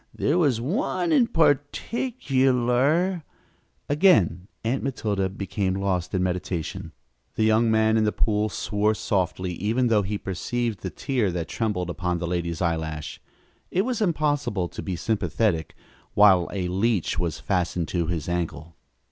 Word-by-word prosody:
There 155 +6 +1
was 140 -9 +2
one 230 - -1
in 265 -7 +4
particular 145 - +1 0.3
" - - -42
Again 95 - +4 0.2
Aunt 120 +4 0
Matilda 105 -8 -1
became 95 0 -2
lost 95 -2 -1
in 90 - +1
meditation. 90 -2 -3 0.4
The 110 - +1
young 110 +1 +4
man 110 0 +3
in 110 - +3
the 105 - +2
pool 105 0 +1
swore 105 +1 0
softly, 90 -3 -1
even 115 +7 0
though 110 -2 +4
he 100 +1 -2
perceived 110 +3 -3
the 95 - -4
tear 120 0 -1
that 85 -2 -3
trembled 90 -6 -2
upon 90 0 -2
the 85 - -3
lady's 85 0 -2
eyelash. 80 -2 -3 0.5
It 190 - +1
was 245 -3 -2
impossible 145 - 0
to - - -7
be 95 - -3
sympathetic 100 -4 -1 0.4
while 95 -4 +6
a 95 -3 -2
leech 95 -2 0
was 85 -2 -2
fastened 90 -3 -1
to 85 -3 -1
his 85 -3 -3
ankle. 85 -2 -3
105 Hz, 150 wpm, -25 LUFS, 90-130 Hz, 0.5 s, while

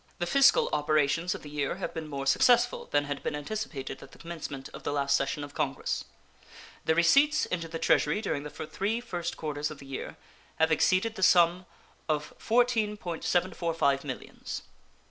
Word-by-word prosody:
The 175 - -1
fiscal 275 +9 +5
operations 155 +3 +1
of - - -9
the 150 - -9
year 145 0 -1
have 190 - -5
been 160 -2 -5
more 140 -2 -4
successful 240 - +3
than 145 0 +2
had 145 -1 -4
been - - -2
anticipated 150 -5 -5
at 135 - -13
the - - -14
commencement 155 -5 -7
of - - -9
the - - -2
last 140 -1 +2
session 140 +1 -1
of 145 0 -9
Congress. 135 -1 -2 0.8
The 160 - +3
receipts 280 - +4
into 170 -2 -3
the 165 0 -5
Treasury 150 +2 +2
during 200 -9 -2
the 150 - -7
three 195 +9 -3
first 175 -8 -4
quarters 150 -1 -3
of 155 - -8
the 140 - -12
year 135 -1 -6 0.4
have 160 0 +2
exceeded 185 +7 +3
the 200 - -8
sum 180 0 +4 0.4
of 150 -1 -1
$14.745 180 - +1
millions. 130 -4 -6
160 Hz, 170 wpm, -29 LUFS, 145-185 Hz, 0.8 s, fiscal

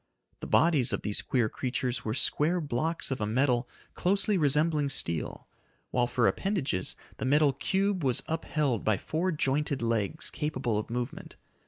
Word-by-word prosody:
The - - -6
bodies 155 -7 +3
of - - -2
these 105 -1 0
queer 125 -5 +1
creatures 125 +3 -2
were 110 +1 -2
square 165 +6 +2
blocks 155 +2 -2
of 130 - -2
a 105 - 0
metal 125 +1 +1 0.2
closely 200 +3 +2
resembling 150 -1 +2
steel, 85 - -2 0.4
while 120 -1 +2
for 120 -1 +2
appendages, 160 - -1 0.2
the - - -3
metal 145 +1 +4
cube 190 +5 0
was 130 -1 +1
upheld 150 -7 -1
by 110 -2 +2
four 170 - -1
jointed 140 -3 0
legs 115 +6 -1
capable 130 -8 -1
of 110 - -6
movement. 120 +2 -5
140 Hz, 155 wpm, -29 LUFS, 120-160 Hz, 0.4 s, metal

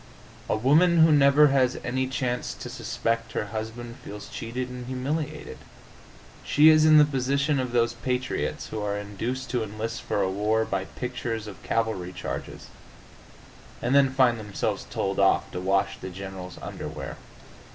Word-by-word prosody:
A - - +2
woman 160 +8 +5
who 160 - +4
never 145 0 +6
has 130 -2 +2
any 130 +2 -1
chance 125 -2 -2
to 125 - -8
suspect 115 -1 -2
her - - -1
husband 115 +2 -5
feels 105 0 -9
cheated 125 +2 -4
and 125 -1 -8
humiliated. 135 +4 -4 0.8
She 150 +2 +6
is 155 0 +6
in 155 -1 +7
the 150 - +8
position 140 +1 0
of 130 -2 -2
those 120 -1 +2
patriots 125 +1 -2
who 110 - -4
are 105 0 -1
induced 115 +6 -4
to 125 -2 0
enlist 110 +2 -4
for 100 - -1
a 95 - 0
war 110 +3 +1
by 95 -2 -2
pictures 120 -2 -4
of 105 -2 -10
cavalry 110 -6 -1
charges, - - -6 1.1
and 125 - -1
then 140 -1 +6
find 130 -3 +3
themselves 105 -2 -3
told - - -2
off - - +3
to 90 - -4
wash 100 +1 +1
the 95 - -6
general's 95 -1 -8
underwear. - - -6
120 Hz, 160 wpm, -26 LUFS, 110-130 Hz, 1.1 s, the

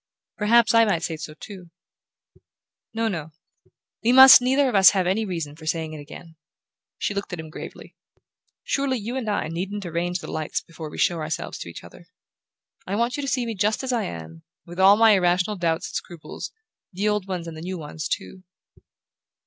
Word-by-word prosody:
"Perhaps 220 +1 +4
I 230 0 +6
might 195 -7 0
say 165 - -2
so 155 0 -8
too." 180 0 -11 1.2
"No, 225 0 -1
no: 160 -6 -5 0.7
we 235 - +3
must 260 -1 +10
neither 265 +3 +2
of 255 - -1
us 195 -2 +8
have 185 - +1
any 200 +5 0
reason 165 -6 -5
for 160 0 -12
saying 160 -1 -2
it 155 - -7
again." 160 +3 -12 0.6
She - - -2
looked 200 0 -4
at 180 - -5
him 160 -1 -8
gravely. - - -10 0.7
"Surely 275 -2 0
you 230 +3 -5
and 245 -5 -3
I 205 - -1
needn't 190 +5 -4
arrange 175 +1 -2
the 190 - -8
lights 155 -1 -2
before 165 -2 -10
we - - -10
show 170 -2 +1
ourselves 155 -1 -4
to - - -7
each 85 - -10
other. 85 - -15 0.8
I 195 - -2
want 235 +4 0
you 290 - -3
to 275 - -4
see 250 -3 0
me 230 - -3
just 210 +4 0
as 260 -1 -2
I 230 -3 0
am, 80 -1 -8 0.2
with 175 +1 -10
all 195 +2 +7
my 225 0 +6
irrational 180 +1 +2
doubts 165 -3 -1
and - - -21
scruples; 170 -3 -7 0.4
the 200 +3 -2
old 210 -2 0
ones 180 -3 -4
and 165 - -7
the 155 - -9
new 185 +2 -5
ones 155 0 -6
too." 190 -1 -5
185 Hz, 200 wpm, -24 LUFS, 165-220 Hz, 1.2 s, must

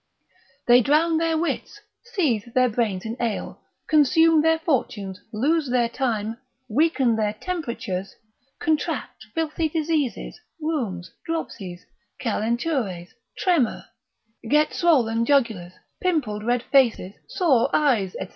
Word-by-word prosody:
They 245 +1 +7
drown 315 +5 +3
their 325 -1 +1
wits, 335 +1 -3 0.4
seethe 240 - 0
their 255 -1 +4
brains 215 -5 -1
in 225 +1 -4
ale, 230 -3 -3 0.3
consume 315 +2 +5
their 320 +1 +3
fortunes, 225 - -2
lose 285 +6 +1
their 245 -2 +2
time, 230 -3 -2 0.3
weaken 265 -1 +2
their 210 -1 0
temperatures, 235 - -4 0.4
contract 310 -7 -2
filthy 320 0 -1
diseases, 310 - -2 0.2
rheums, 235 - -3
dropsies, 200 - -5 0.3
calentures, 225 - -2 0.2
tremor, 335 - +1 0.6
get 300 +2 +3
swollen 235 -10 +2
jugulars, 230 -10 +1 0.3
pimpled 275 -13 0
red 240 +1 0
faces, 235 -8 +2 0.2
sore 275 -10 +2
eyes, 235 -11 +2
&c. - - -5
250 Hz, 110 wpm, -24 LUFS, 220-315 Hz, 0.6 s, They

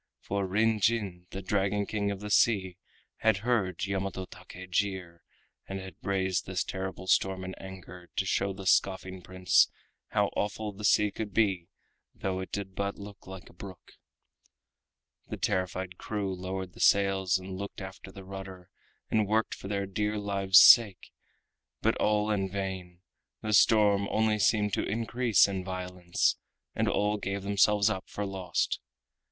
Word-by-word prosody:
For 100 -1 -3
Kin 110 +2 +2
Jin, 100 -5 0
the 95 - -7
Dragon 100 +1 0
King 100 -1 -2
of 100 -1 -4
the 105 0 -5
Sea, 95 -5 +3 0.4
had 110 -2 +2
heard 100 -7 0
Yamato 95 -1 -3
Take 90 0 -12
jeer, 90 -3 -2 0.5
and 95 0 -4
had 95 -1 -9
raised 95 -1 -1
this 95 -1 -1
terrible 95 0 -5
storm 95 0 +2
in 95 0 -5
anger, 95 -2 -11
to 95 - 0
show 100 +1 0
the 95 0 -8
scoffing 95 0 +1
Prince 95 +1 +3 0.4
how - - +1
awful 105 +1 -2
the 105 +2 -10
sea 105 0 +4
could 105 -3 -6
be 95 -6 +2 0.5
though 95 -1 -3
it 95 - -6
did 100 -1 -4
but 100 +1 -3
look 100 -1 -11
like 95 -1 -9
a - - -16
brook. 95 0 -11 1.4
The - - -5
terrified 90 0 -2
crew 100 -3 -3
lowered 95 0 -5
the - - -15
sails 95 -2 +3
and 95 0 -7
looked 100 +1 -6
after 95 0 -9
the 95 0 -11
rudder, 95 -2 -9 0.4
and 110 -2 +2
worked 110 +2 +1
for - - -8
their 100 -1 -1
dear 105 +2 -2
lives' 100 -2 +3
sake, 105 -6 +7 0.7
but - - +1
all 105 0 +1
in 95 -2 0
vain—the 95 +2 -6
storm 105 -2 +5
only 110 -1 +1
seemed 105 0 +2
to - - +1
increase 115 -1 +2
in 95 -2 -3
violence, 90 -1 -1 0.4
and - - 0
all 105 +1 +1
gave 100 -1 -4
themselves 100 +1 +3
up 95 - -5
for 105 - -4
lost. 95 -3 -1
95 Hz, 160 wpm, -29 LUFS, 95-105 Hz, 1.4 s, sake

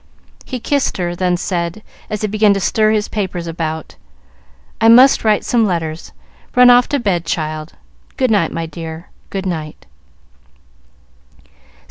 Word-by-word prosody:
He 255 - -5
kissed 280 +3 -1
her, 175 -1 -2
then 180 0 0
said, 175 +3 -3 0.3
as 210 - -4
he 215 - 0
began 210 -1 +3
to - - -1
stir 215 +3 +2
his 215 -1 0
papers 185 -5 -4
about, 160 - -5 0.8
"I 225 - +5
must 255 +4 +6
write 215 -2 +2
some 235 -2 +2
letters. 165 -3 -4 0.4
Run 250 0 +7
off 245 0 +4
to 285 - 0
bed, 190 -7 0
child. 155 -1 -4 0.4
Good 255 -4 +1
night, 200 -6 +2
my 165 - -3
dear, 160 +1 -8 0.2
good 195 -1 -4
night." 160 -4 -5
185 Hz, 145 wpm, -17 LUFS, 165-220 Hz, 0.8 s, Run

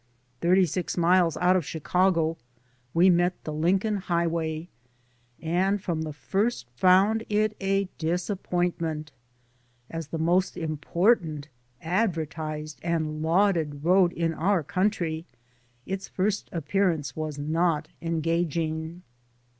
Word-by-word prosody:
Thirty 185 +4 +4
six 180 +1 -3
miles 175 -1 +3
out 180 +1 +3
of 185 - +2
Chicago 165 +2 +1 0.6
we 175 +5 +5
met 175 +1 +2
the 155 - -5
Lincoln 190 +7 +1
Highway 170 -3 -1 0.7
and 185 +5 +1
from 170 -5 -2
the 155 -1 -4
first 190 - -1
found 190 - +4
it 215 0 +1
a 195 0 +1
disappointment. 170 -3 -2 0.8
As 165 -2 -5
the 165 - -4
most 175 +4 +1
important, 160 0 0 0.3
adver 175 -2 +1
tised 155 0 -6
and 160 -2 -1
lauded 160 -4 +1
road 180 0 +5
in 165 -1 -1
our 180 +1 +1
country, 180 -3 -1 0.6
its 195 0 -4
first 200 +2 -1
ap 160 -4 -5
pearance 180 -7 +1
was 155 -2 -4
not 155 +1 0
engaging. 165 0 -1
170 Hz, 115 wpm, -26 LUFS, 160-185 Hz, 0.8 s, we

